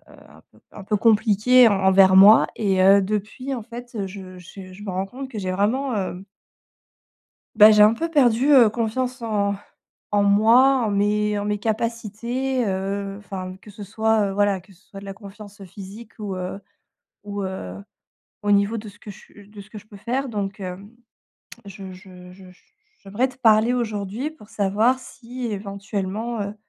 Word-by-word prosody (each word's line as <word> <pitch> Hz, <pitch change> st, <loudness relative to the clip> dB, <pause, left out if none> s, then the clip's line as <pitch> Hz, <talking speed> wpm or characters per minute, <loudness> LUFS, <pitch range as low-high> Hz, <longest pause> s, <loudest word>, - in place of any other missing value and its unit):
heu, -, -, -24 dB
un -, -, -19 dB
peu -, -, -23 dB
un 205 Hz, -, -10 dB
peu 210 Hz, +1 st, 0 dB
compliquées 225 Hz, +3 st, +4 dB
en 200 Hz, -2 st, 0 dB
envers 190 Hz, 0 st, +5 dB
moi 205 Hz, +3 st, +8 dB
et 195 Hz, -3 st, +1 dB
heu, 195 Hz, +1 st, +6 dB
depuis, 215 Hz, +7 st, -4 dB
en 240 Hz, -, -6 dB
fait, 240 Hz, +2 st, -11 dB
heu, 200 Hz, -3 st, -3 dB
je 185 Hz, -1 st, -11 dB
j 185 Hz, +1 st, -12 dB
je 200 Hz, +3 st, -12 dB
me 205 Hz, -, -6 dB
rends 185 Hz, +1 st, -2 dB
compte 260 Hz, +5 st, -9 dB
que 225 Hz, -, -7 dB
j'ai 185 Hz, -2 st, -3 dB
vraiment, 230 Hz, +7 st, -1 dB
hem 190 Hz, -1 st, -4 dB, 1.3 s
bah, 210 Hz, +1 st, +8 dB
j'ai 210 Hz, -1 st, +5 dB
un 210 Hz, +1 st, +6 dB
peu 330 Hz, +8 st, -3 dB
perdu, 270 Hz, -3 st, +3 dB
heu, 245 Hz, -5 st, +7 dB
confiance 245 Hz, +3 st, -3 dB
en 205 Hz, -3 st, -1 dB, 0.6 s
en 205 Hz, -1 st, +2 dB
moi, 230 Hz, +7 st, +4 dB
en 220 Hz, -, -1 dB
mes 210 Hz, +1 st, 0 dB
en 205 Hz, -, -3 dB
mes 210 Hz, 0 st, -2 dB
capacités, 235 Hz, +3 st, -3 dB
heu, 195 Hz, +1 st, -3 dB
enfin, 185 Hz, -2 st, -7 dB
que -, -, -15 dB
ce 205 Hz, +1 st, -10 dB
soit, 220 Hz, 0 st, 0 dB
heu, -, -, -4 dB
voilà, 205 Hz, -1 st, +1 dB
que 195 Hz, +2 st, -20 dB
ce 180 Hz, -, -26 dB
soit 195 Hz, -, -11 dB
de 200 Hz, -, -12 dB
la 195 Hz, -, -7 dB
confiance 205 Hz, 0 st, -13 dB
physique 200 Hz, +4 st, -12 dB
ou, 205 Hz, -3 st, -5 dB
heu, 185 Hz, +1 st, -5 dB, 0.7 s
ou, 205 Hz, 0 st, -5 dB
heu, 190 Hz, -, -6 dB, 0.7 s
au 205 Hz, -, 0 dB
niveau 200 Hz, +2 st, +2 dB
de 215 Hz, -1 st, -8 dB
ce 205 Hz, -, -19 dB
que -, -, -12 dB
je 205 Hz, +1 st, -17 dB
de 210 Hz, 0 st, -12 dB
ce 200 Hz, -, -17 dB
que 215 Hz, -, -11 dB
je 210 Hz, -, -12 dB
peux 210 Hz, -, -15 dB
faire. 245 Hz, +7 st, -3 dB
Donc, 205 Hz, -4 st, -5 dB
hem, 195 Hz, +3 st, -8 dB, 0.7 s
je 195 Hz, -1 st, -10 dB
je 180 Hz, -1 st, -14 dB
je 190 Hz, +1 st, -15 dB, 0.5 s
j'aimerais 205 Hz, +7 st, -2 dB
te 255 Hz, -, -15 dB
parler 225 Hz, -1 st, +3 dB
aujourd'hui 220 Hz, +3 st, -3 dB
pour 315 Hz, -10 st, -17 dB
savoir 215 Hz, +6 st, +1 dB
si, 250 Hz, 0 st, -10 dB
éventuellement, 200 Hz, +2 st, -5 dB
heu, 200 Hz, 0 st, -4 dB
205 Hz, 190 wpm, -22 LUFS, 195-230 Hz, 1.3 s, moi